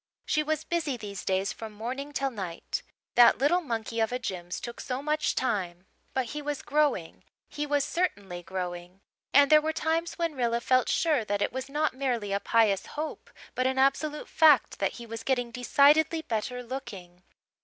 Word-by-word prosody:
She 305 - +1
was 310 0 -1
busy 320 -7 -1
these 200 -4 -7
days 190 +1 0
from 220 -1 -8
morning 255 +7 -5
till 275 -1 -1
night. 190 -7 -5 0.3
That 240 -1 +7
little 295 +7 +3
monkey 230 -5 -3
of 225 0 +1
a 250 - 0
Jims 180 -7 -5
took 240 - -7
so 260 +1 -4
much 305 +1 0
time. 185 -7 -2 0.3
But 260 -1 +1
he 300 - -4
was 290 -1 -4
growing 290 - 0 0.2
he 295 0 -4
was 290 -1 +2
certainly 200 - -2
growing. 180 +1 -6 0.3
And 280 +1 +6
there 305 0 +8
were 315 +1 0
times 325 +2 -1
when 335 -2 -1
Rilla 235 -3 0
felt 255 +1 +2
sure 305 -8 +2
that 205 0 0
it - - -2
was 260 +1 -5
not 300 +2 0
merely 245 -6 -2
a 200 - +1
pious 210 -3 +2
hope 310 +1 -5 0.2
but 255 0 +1
an 265 0 -1
absolute 290 +3 +1
fact 305 -6 +4
that 195 -1 0
he 235 - -9
was 230 0 -6
getting 245 -1 0
decidedly 295 +6 +4
better 250 +1 -3
looking. 200 -9 -8
255 Hz, 185 wpm, -28 LUFS, 205-295 Hz, 0.3 s, there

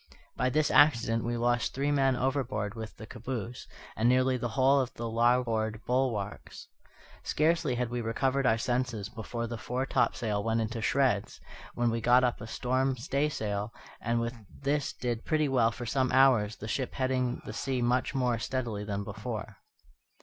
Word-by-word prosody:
By 130 - +1
this 150 +3 +1
accident 115 -6 +4
we 120 0 -1
lost 120 +1 +1
three 140 +2 0
men 135 -2 +3
overboard 120 -6 -1
with 110 -1 -8
the 110 - -8
caboose, 120 0 -6 0.3
and 115 +2 +2
nearly 130 +1 +3
the 120 -1 -2
whole 135 +2 +5
of 130 -2 -1
the 120 - -4
larboard 115 -2 +1
bulwarks. 120 -6 -2 0.5
Scarcely 155 -3 +1
had 120 -1 -2
we 120 0 -2
recovered 130 +4 0
our 110 - +4
senses 120 -3 -1
before 115 +1 -5
the 115 -1 -5
foretopsail 120 -4 0
went 115 +1 +1
into 115 +1 -2
shreds, 120 -4 +1 0.4
when 120 -1 +1
we 115 0 -2
got 125 +3 +5
up 120 -4 0
a 110 - -6
storm 130 +3 0
staysail, 115 -6 -2 0.3
and 115 0 0
with 115 +1 -2 0.3
this 145 0 0
did 120 -2 -3
pretty 155 -1 +1
well 125 -4 +3
for 120 +1 -7
some 130 +2 +1
hours, 125 -6 +4
the 105 - -8
ship 130 +3 -2
heading 130 -1 0
the - - -6
sea 135 -2 -2
much 125 +2 +1
more 125 -3 +1
steadily 120 -5 -3
than 100 -1 -3
before. 105 +2 -6
120 Hz, 170 wpm, -29 LUFS, 115-130 Hz, 0.5 s, whole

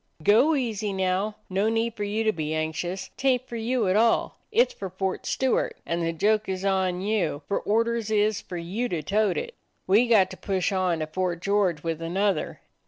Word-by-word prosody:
"Go 245 - +5
easy 220 -6 -2
now. 190 +2 0
No 195 +3 +1
need 225 0 0
for 210 - -4
you 210 +2 -1
to 220 - +3
be 155 -4 -3
anxious. 160 +4 -3
'T 270 - -1
ain't 255 0 +1
for 235 - -7
you 230 -1 0
at 185 - +2
all. 225 +2 +2
It's 470 +3 +3
for 195 - -6
Fort 190 +1 -3
Stewart; 265 -1 0
and 170 0 -1
the 165 0 0
joke 210 +5 +1
is 190 0 -3
on 190 -2 +1
you, 190 -8 -1
for 200 - 0
or 220 +3 +2
ders 230 -2 -2
is 215 -1 +2
for 180 - -7
you 195 +9 -3
to 165 -3 -2
tote 210 +5 +1
it. 475 0 -4 0.3
We 215 +6 +4
got 205 -5 +4
to - - -8
push 190 0 -1
on 185 -4 0
to - - 0
Fort 175 +2 -2
George 190 -5 +1
with 165 -1 -3
another. 190 +1 -1
200 Hz, 210 wpm, -26 LUFS, 180-220 Hz, 0.3 s, Go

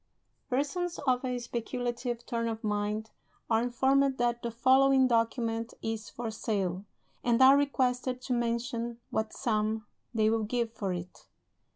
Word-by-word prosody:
Persons 295 +7 -1
of 255 -1 +2
a 250 -1 -1
speculative 240 0 -3
turn 230 -2 -1
of 225 0 -4
mind 210 +1 -1 0.4
are 225 0 +4
informed 265 +3 +2
that 240 0 0
the 235 - -2
following 260 +3 +5
document 230 -1 0
is 225 -1 -3
for 235 -2 -5
sale, 195 -4 -2 0.4
and 240 -1 +3
are 265 +1 +8
requested 255 -3 +1
to 255 - -1
mention 235 0 -1
what 220 0 -1
sum 215 -1 -1 0.3
they 220 -3 +2
will 225 0 +2
give 230 +1 -1
for 200 -4 -3
it. 175 0 -7
235 Hz, 145 wpm, -30 LUFS, 220-255 Hz, 0.4 s, are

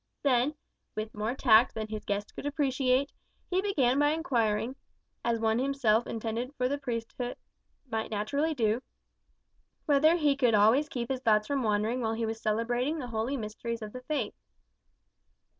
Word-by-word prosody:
Then, 270 +1 +2 0.4
with 215 +1 -4
more 215 +3 -2
tact 235 -2 +5
than 220 -1 -3
his 215 -1 -5
guest 205 0 -3
could - - -4
appreciate, 275 -2 +1 0.4
he 370 +1 +2
began 280 -10 +2
by 290 0 +4
inquiring 240 -7 0 0.5
as 235 -1 +1
one 220 +1 +2
himself 255 -4 +2
intended 230 +4 -3
for 250 -2 +1
the 285 +2 -2
priesthood 245 -1 -4 0.5
might 225 -2 -2
naturally 280 +10 -1
do 225 -1 +1 1.0
whether 310 +2 +5
he 295 -4 +2
could 250 -5 +3
always 230 +9 +4
keep 240 -1 -3
his 260 -1 -2
thoughts 215 -3 +3
from 280 +3 -1
wandering 220 +2 0
while 225 -1 0
he 225 0 -1
was 225 0 -4
celebrating 240 +7 0
the 255 -5 -5
holy 230 +5 -1
mysteries 230 +1 -5
of 210 - -7
the 255 - -7
faith. 255 -5 -2
245 Hz, 160 wpm, -29 LUFS, 220-275 Hz, 1.0 s, tact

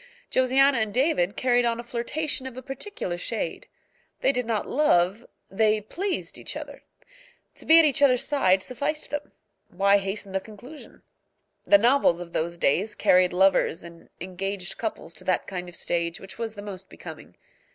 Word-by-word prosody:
Josiana 260 +1 +4
and 220 -1 -1
David 210 - +1
carried 245 -1 +2
on 235 -1 0
a - - -5
flirtation 260 +4 -2
of 255 -1 -10
a 260 - -7
particular 270 - -5
shade. - - -4 0.5
They - - +4
did 250 -3 -2
not 225 -3 -1
love, 205 -6 +2 0.2
they 215 +2 +2
pleased, 365 - -4
each - - -5
other. - - -9 0.8
To - - -11
be 320 - +8
at 330 - +7
each 295 0 +2
other's 255 -3 +4
side 190 -10 +2
sufficed 285 +4 -3
them. 295 0 -4 0.4
Why 200 +2 +3
hasten 195 0 -5
the 190 - 0
conclusion? 225 +9 -13 0.6
The 200 - +7
novels 235 -5 +3
of 175 -1 -9
those 170 +2 -2
days 195 +8 +1
carried 180 0 +4
lovers 185 -2 +2
and 170 -1 -13
engaged 190 +1 -5
couples 215 -7 -4
to 185 - -8
that 185 0 0
kind 180 -2 -6
of 175 - -11
stage 170 0 -2
which 195 - -12
was 225 -1 -4
the 205 - -8
most 195 -2 -8
becoming. - - -11
215 Hz, 170 wpm, -25 LUFS, 185-260 Hz, 0.8 s, be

